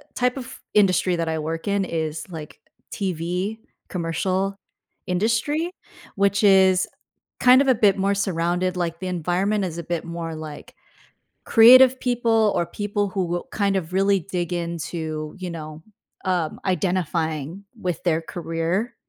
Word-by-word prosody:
type 250 +1 +1
of 250 -3 -8 0.2
industry 185 -3 +3
that 165 -1 -2
I 160 -1 -1
work 165 +3 -4
in 200 -1 +1
is, 160 -2 -3
like, 160 -4 -9 0.3
TV 180 +2 -2 0.3
commercial 185 +3 -1 0.5
industry, 230 - 0 0.4
which 200 +1 +2
is 190 -2 +5 0.5
kind 255 +1 +7
of 280 - +1
a 260 - +6
bit 205 -3 +3
more 195 +1 +1
surrounded, 180 -1 0
like, 170 -1 -2
the 185 - -4
environment 185 +4 0
is 170 -2 -5
a - - -5
bit 170 0 -3
more 170 -1 -5
like 155 -2 -9 0.7
creative 255 +3 +8
people 230 -3 +2
or 170 - +1
people 205 +3 -2
who 190 -1 -1
will 175 0 -3
kind 200 -2 0
of 180 -2 -3
really 195 +1 +3
dig 180 -1 -3
into, 160 -2 -4
you 185 -2 -5
know, 155 -1 -8 0.4
um, 180 -4 -1
identifying 170 -2 -1 0.2
with 180 -3 -2
their 165 -3 +2
career 175 +7 -3
180 Hz, 145 wpm, -23 LUFS, 165-200 Hz, 0.7 s, creative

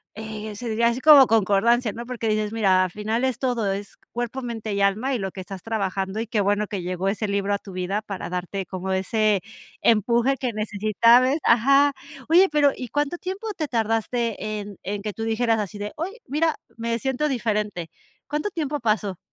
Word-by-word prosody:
eh, 215 -1 -6
se 245 - -6
diría 230 +2 +2
así 235 +2 -2
como 290 -1 +9
concordancia, 225 +1 +2
¿no?, 235 - -7
porque 240 -2 -4
dices, 215 -1 0
mira, 195 -4 +3
al 185 - -2
final 215 +5 -2
es 260 -3 0
todo, 240 -6 0
es 200 +1 -5 0.2
cuerpo, 240 +2 -3
mente 225 -3 -4
y 200 - -1
alma, 210 +7 +1
y - - -2
lo 195 -1 -3
que 190 - -9
estás 185 0 -8
trabajando, 195 -2 -2
y 225 - -3
qué 215 -1 0
bueno 205 +1 +1
que 195 -2 -4
llegó 180 +1 -3
ese 210 +1 -1
libro 200 0 0
a 200 - 0
tu 200 - -11
vida 185 +3 -2
para 200 -3 -6
darte 180 +2 -4
como 185 +1 -5
ese 205 +2 +1 0.4
empuje 235 +4 +3
que 255 -2 -2
necesitabas 220 +5 +3
ajá, 275 +5 +5 0.3
oye, 360 +4 +6
pero, 290 -2 +4
¿y 250 - -7
cuánto 290 +6 -1
tiempo 385 +5 -5
te 310 -3 -3
tardaste 225 -1 -1
en 205 -2 -8
en 200 +1 -3
que 210 0 -4
tú 225 - -5
dijeras 225 0 +1
así 205 -1 -4
de: 205 0 -5
"Oye, 380 +9 -5
mira, 315 +3 +1 0.2
me 230 0 -2
siento 265 +4 -1
diferente"?, 210 - -2 0.4
¿cuánto 300 +7 -2
tiempo 300 -5 -3
pasó? 210 -4 0
220 Hz, 200 wpm, -24 LUFS, 200-250 Hz, 0.4 s, como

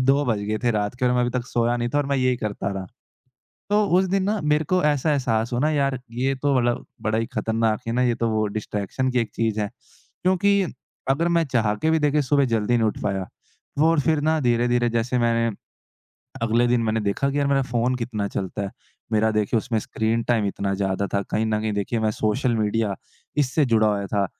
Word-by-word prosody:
2 140 +2 +4
बज 115 -4 +1
गए 110 0 0
थे 120 - +4
रात 105 0 -1
को - - +1
और 125 - +3
मैं 125 - +2
अभी 120 - +1
तक 125 -1 -3
सोया 120 0 +1
नहीं 120 0 -1
था - - +4
और 145 - 0
मैं 140 - 0
यही 130 -1 +2
करता 105 -4 -3
रहा। 95 -1 -5 0.8
तो 210 +1 +3 0.2
उस 190 - +2
दिन 195 0 +1
ना 210 +2 0
मेरे 150 +1 +2
को 185 - +3
ऐसा 150 0 +2
एहसास 120 -5 0
हुआ 120 - 0
ना 155 - +3
यार 140 -3 0
ये 130 +3 0
तो 145 -1 +2
मतलब 120 0 0 0.2
बड़ा 110 0 0
ही 115 - 0
खतरनाक 110 -1 0
है 115 - -1
ना 125 - +1
ये 120 -1 +2
तो 115 -1 0
वो 110 -1 +1
डिस्ट्रैक्शन 105 +5 -2
की 125 - +1
एक 115 - -2
चीज़ 110 -2 0
है 105 - -2 0.5
क्योंकि 200 +2 +3 0.5
अगर 155 +6 +2
मैं 165 - +3
चाह 115 -6 +1
के 160 +10 0
भी 160 - +3
देखिए 150 0 +2
सुबह 140 0 +2
जल्दी 110 +2 +1
नहीं 115 -1 +2
उठ 105 - -3
पाया 95 -2 -1 0.5
वो 160 +2 +5
और 165 -2 +3
फ़िर 155 +1 +1
ना 155 +1 +2
धीरे-धीरे 120 -1 +2
जैसे 120 +2 0
मैंने 115 -2 +1 0.9
अगले 115 +1 +2
दिन 120 -1 +2
मैंने 110 0 0
देखा 105 +7 0
कि 145 - -2
यार 140 - +1
मेरा 140 -1 +2
फ़ोन 125 +1 +1
कितना 115 -4 -3
चलता 95 +1 -4
है 100 - -4 0.4
मेरा 110 0 +3
देखिए 105 +1 +1
उसमें 115 0 -1
स्क्रीन 110 +2 -1
टाइम 115 -4 +1
इतना 100 0 -2
ज़्यादा 95 0 -1
था 100 - +2
कहीं 110 +1 +1
न 110 -1 0
कहीं 110 -1 -1
देखिए 105 +3 -1
मैं 110 -1 +1
सोशल 115 +4 0
मीडिया 105 -1 0 0.4
इससे 145 +1 +2
जुड़ा 110 -3 +3
हुआ 100 -1 0
था। 100 -1 0
120 Hz, 230 wpm, -23 LUFS, 110-135 Hz, 0.9 s, वो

